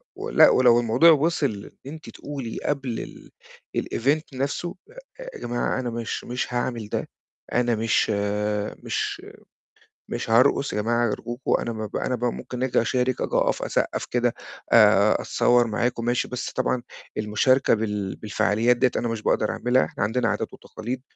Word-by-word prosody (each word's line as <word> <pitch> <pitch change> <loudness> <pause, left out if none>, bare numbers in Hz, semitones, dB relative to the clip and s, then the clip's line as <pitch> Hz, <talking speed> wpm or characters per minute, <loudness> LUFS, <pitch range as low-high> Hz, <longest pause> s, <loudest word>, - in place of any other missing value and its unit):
ولأ، - - +5
ولو 120 -2 +5
الموضوع 120 +8 +5
وصل 145 -9 0
إن 140 - -7
أنتِ 160 - -10
تقولي 135 -6 -6
قبل 135 -5 -4 0.5
الEvent 145 +6 0
نفسه، 140 +6 -3 0.4
يا - - -8
جماعة 120 +2 -1
أنا 125 -2 -2
مش 115 -1 -4
مش 125 0 -4
هاعمل 120 -3 -2
ده، - - -3 0.4
أنا 120 -1 +2
مش 110 +1 +1 0.7
مش - - -2 0.9
مش - - -4
هارقص 125 +4 +3
يا 105 - 0
جماعة 120 +1 +1
أرجوكم، 120 +4 -3
أنا 115 - -3
ما 110 -1 -4
ب 105 - -9
أنا 125 - -1
ب 120 0 -3
ممكن 125 +1 -3
آجي 130 -2 +2
أشارِك، 125 +2 0
آجي - - -2
أقف، - - +1
أسقّف - - -1
كده، 120 -1 0 0.4
آآ، - - +6
أتصور 120 -1 +3
معاكم، 115 +1 -1
ماشي، 120 +1 0
بس 125 - -4
طبعًا 125 - -1 0.3
المشاركة 110 +5 +2
بال 105 -3 -2
بالفعاليات 110 +3 +1
ديّة 125 0 +3
أنا 120 - -1
مش 115 -2 -3
باقدر 110 - +1
أعملها، 125 +1 +2
إحنا - - -4
عندنا 110 +4 +1
عادات - - -3
وتقاليد، 120 +4 -6
120 Hz, 155 wpm, -24 LUFS, 115-130 Hz, 0.9 s, آآ